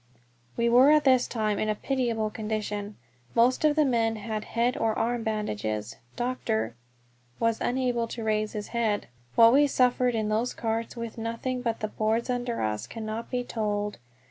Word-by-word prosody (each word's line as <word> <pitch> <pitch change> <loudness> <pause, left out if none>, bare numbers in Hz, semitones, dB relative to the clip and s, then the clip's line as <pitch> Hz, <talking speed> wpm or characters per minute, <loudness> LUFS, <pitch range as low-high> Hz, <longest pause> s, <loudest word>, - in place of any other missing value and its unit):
We 235 - +2
were 250 +4 +6
at 305 0 +5
this 255 -2 +4
time 215 -3 -1
in 215 - 0
a 215 - +1
pitiable 230 -3 -1
condition. 210 -1 -4 0.4
Most 245 +5 +3
of 305 -1 +4
the 305 -1 +4
men 230 -3 +1
had 215 0 -4
head 240 +2 0
or 225 -6 0
arms 235 0 -1
bandaged; 110 - -2 0.2
Dr. 120 - -1 0.7
was 230 -1 +1
unable 245 -2 0
to 230 0 -6
raise 215 -1 0
his 210 -1 -5
head. 225 - -1 0.3
What 230 0 +7
we 290 +2 +6
suffered 250 -2 +2
in 215 -1 0
those 225 +4 0
carts 225 +1 -2
with 230 -1 -6
nothing 230 +3 -3
but 230 -2 -2
the 215 - 0
boards 220 +3 0
under 245 -1 -2
us 105 +1 -2
cannot 220 - -5
be 250 -1 -1
told. 210 - -2
230 Hz, 170 wpm, -27 LUFS, 215-245 Hz, 0.7 s, What